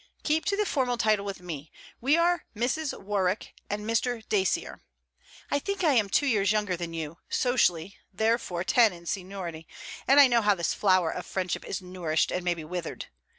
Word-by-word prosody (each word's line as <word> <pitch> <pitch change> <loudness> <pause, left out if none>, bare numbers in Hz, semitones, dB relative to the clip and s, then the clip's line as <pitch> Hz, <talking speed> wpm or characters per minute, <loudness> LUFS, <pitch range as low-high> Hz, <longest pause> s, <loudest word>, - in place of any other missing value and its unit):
'Keep 315 +1 +1
to 400 - 0
the 420 - +1
formal 255 -8 0
title 215 -2 +2
with 195 -2 -6
me. 160 -4 -7 0.3
We 280 +6 +3
are 345 0 +2
Mrs. 265 +7 -1
Warwick 195 -1 -1 0.2
and 210 +1 -3
Mr. 230 0 -1
Dacier. 190 -3 0 0.7
I 285 - +2
think 400 +5 -3
I 310 -4 +4
am 215 -5 +2
two 285 - +2
years 205 -7 +2
younger 210 -4 0
than 170 -1 -5
you; 160 0 -5
socially 195 -8 +1
therefore 210 -4 0
ten 215 +2 +4
in 170 0 -13
seniority; 180 -4 -5 0.4
and 275 +3 +6
I 285 - +10
know 240 -2 +3
how 205 -1 +3
this 170 -2 -1
flower 185 -4 +3
of - - -6
friendship 185 -2 -2
is 190 - -5
nourished 175 -4 -1
and 180 - -2
may 175 -1 +1
be 165 - -7
withered. 170 +1 -5
200 Hz, 190 wpm, -28 LUFS, 180-245 Hz, 0.7 s, I